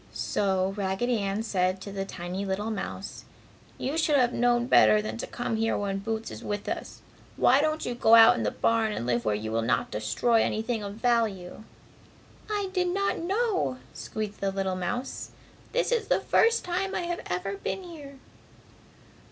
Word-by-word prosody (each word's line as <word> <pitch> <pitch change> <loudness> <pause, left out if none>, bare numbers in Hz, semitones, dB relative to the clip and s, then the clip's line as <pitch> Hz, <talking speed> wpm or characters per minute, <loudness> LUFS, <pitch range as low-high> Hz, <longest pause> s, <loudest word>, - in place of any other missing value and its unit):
So, 190 -1 0
Raggedy 205 +5 0
Ann 200 +2 -1
said 185 -3 0
to 200 - -7
the 195 0 -3
tiny 185 +1 -5
little 200 +3 -2
mouse, 215 - -5 0.5
"You 290 +5 -2
should 310 -2 +2
have 250 -3 +3
known 240 0 +2
better 215 -3 +6
than 215 - -4
to - - -4
come 240 -2 -3
here 225 +1 +1
when 195 -1 -2
Boots 225 +2 -4
is - - -9
with 205 0 -4
us. - - -5 0.3
Why 265 +3 +5
don't 310 +1 0
you 245 - -2
go 230 -1 +5
out 225 -1 +8
in - - -2
the 105 - +1
barn 225 - +1
and 120 - -4
live 120 -1 0
where 105 - +2
you 110 +1 -4
will 115 +1 +1
not 115 +2 0
destroy 120 - +1
anything 225 +1 -1
of 200 0 -6
value?" 220 -5 -1 0.8
"I 410 -2 -1
did 365 -2 +1
not 395 +3 0
know!" 380 - 0 0.2
squeaked 215 -1 -5
the 195 - +1
little 190 -1 -1
mouse, 185 +9 -4 0.4
"This - - 0
is 470 -3 +1
the - - +3
first 460 0 +3
time 375 +2 -2
I - - 0
have 345 0 -3
ever 180 +3 -2
been 380 - -4
here!" 295 -6 -10
220 Hz, 185 wpm, -27 LUFS, 195-270 Hz, 0.8 s, out